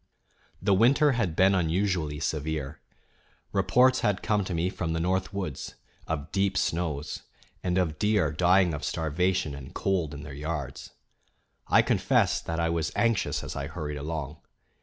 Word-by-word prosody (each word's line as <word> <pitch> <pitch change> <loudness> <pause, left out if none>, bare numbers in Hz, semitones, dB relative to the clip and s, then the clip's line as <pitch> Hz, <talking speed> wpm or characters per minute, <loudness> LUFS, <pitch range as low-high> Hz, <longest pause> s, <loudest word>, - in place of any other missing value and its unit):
The 100 +1 +2
winter 135 +9 +5
bad 110 -10 -1
been 95 +3 +5
unusually 85 -3 0
severe. 75 -2 -3 0.7
Reports 130 +1 +4
had 105 -4 0
come 105 -2 +1
to 95 - -4
me 85 +2 +1
from 85 -4 -3
the 80 - -1
North 95 +2 0
Woods 95 -8 -5 0.3
of 80 -1 -3
deep 95 -1 +1
snows, 80 -3 -2 0.4
and 90 0 0
of 80 -4 0
deer 105 -7 +2
dying 90 +2 +3
of 75 - -5
starvation 80 0 0
and 70 -1 -10
cold 85 -6 0
in 70 - -8
their 75 -3 -8
yards. 75 -2 -5 0.8
I - - +5
confess - - +2
that 80 0 -3
I 85 - +1
was 80 -1 -1
anxious 115 -4 +1
as - - -6
I 70 0 -3
hurried 75 -3 -5
along. 75 0 -4
85 Hz, 160 wpm, -27 LUFS, 75-95 Hz, 0.8 s, winter